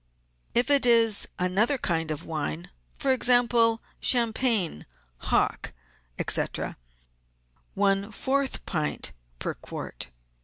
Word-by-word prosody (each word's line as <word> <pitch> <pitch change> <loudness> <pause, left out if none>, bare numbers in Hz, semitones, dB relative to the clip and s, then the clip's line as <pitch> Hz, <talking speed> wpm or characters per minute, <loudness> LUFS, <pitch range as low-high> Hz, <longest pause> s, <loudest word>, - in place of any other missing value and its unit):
If 245 +4 +3
it 280 -1 +4
is 230 -3 +5
another 195 +10 +1
kind 165 -8 -1
of 155 +1 -5
wine, 90 - -4 0.2
for 270 - 0
example, 240 -2 +3 0.2
champagne, 230 - +1 0.3
hock, - - -1 0.5
&c., - - +4 1.3
one 200 +1 +1
fourth 270 +5 -2
pint 155 -4 -2 0.3
per - - -4
quart. - - -8
225 Hz, 100 wpm, -26 LUFS, 175-245 Hz, 1.3 s, is